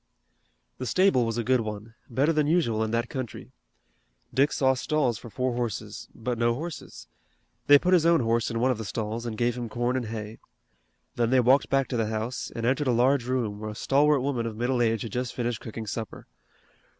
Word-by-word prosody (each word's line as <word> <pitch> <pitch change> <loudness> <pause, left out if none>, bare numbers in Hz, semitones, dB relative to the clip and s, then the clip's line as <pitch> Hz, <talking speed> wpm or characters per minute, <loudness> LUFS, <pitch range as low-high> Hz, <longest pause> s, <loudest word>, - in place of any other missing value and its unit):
The 130 - -3
stable 155 - +3
was 115 0 -2
a 120 - 0
good 130 +1 +2
one, 105 +1 -6 0.2
better 140 +7 +2
than 150 -1 +2
usual 135 -10 +2
in 110 - -2
that 115 +1 0
country. 130 -7 -6 0.8
Dick 140 +3 +3
saw 130 -1 +3
stalls 130 -3 0
for 120 - -10
four 125 +2 -1
horses, 115 -3 -4
but 120 0 -3
no 115 0 +2
horses. 155 0 -7 0.6
They 145 - +9
put 180 +5 +1
his 175 -3 +5
own 165 -3 +4
horse 115 0 +1
in 115 -1 -2
one 130 +2 +3
of 120 - -3
the - - -3
stalls, 110 +3 -4
and 110 -2 -5
gave 120 +1 +1
him 120 -2 -5
corn 120 +2 -1
and 125 -3 -2
hay. 110 0 -6 0.8
Then 120 -1 +2
they 130 +1 +4
walked 130 +3 +4
back 135 -1 +2
to 125 - -2
the 110 -1 0
house, 110 +3 -3
and 115 - -3
entered 135 +3 +1
a - - +4
large 125 +2 +3
room, 115 -5 -1
where 110 0 -5
a 105 - -7
stalwart 140 +4 +3
woman 125 -4 -1
of 110 -1 -6
middle 120 +1 0
age 115 -2 +1
had 115 - -6
just 125 +2 -3
finished 120 -2 -2
cooking 110 0 -6
supper. 110 0 -6
120 Hz, 215 wpm, -27 LUFS, 115-130 Hz, 0.8 s, They